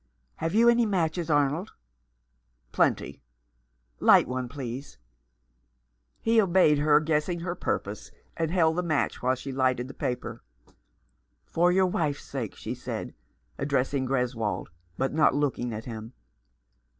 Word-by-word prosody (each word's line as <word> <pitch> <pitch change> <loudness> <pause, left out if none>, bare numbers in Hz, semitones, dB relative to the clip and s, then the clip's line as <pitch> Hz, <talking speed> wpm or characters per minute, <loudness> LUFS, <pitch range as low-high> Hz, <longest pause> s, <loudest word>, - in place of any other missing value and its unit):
" - - -43
Have 165 +4 -2
you 230 +2 +5
any 235 -1 +5
matches, 170 -3 -1
Arnold? 145 +5 +1 0.5
" - - -45
"Plenty." - - 0 0.8
"Light - - +6
one, 125 -1 -3
please." 130 - -7 1.2
He 225 0 +3
obeyed 175 -6 +4
her, 150 0 +5
guessing 160 +3 -1
her 170 0 -2
purpose, - - -3 0.3
and 165 -1 -1
held 165 -2 +2
the - - +2
match 160 -5 -1
while 130 +1 +2
she 135 +2 -7
lighted 130 -1 0
the 135 - -9
paper. 125 -1 -4 0.6
" 65 +2 -45
For 175 +2 +4
your 190 +1 +4
wife's 155 -5 -1
sake," 125 -7 -5
she - - -5
said, - - -6 0.5
addressing 135 -1 0
Greswold, 125 -5 -1 0.3
but 135 +1 -1
not 155 -2 +4
looking 135 -4 -1
at 110 0 -6
him. 115 0 -7
145 Hz, 140 wpm, -27 LUFS, 125-170 Hz, 1.2 s, Light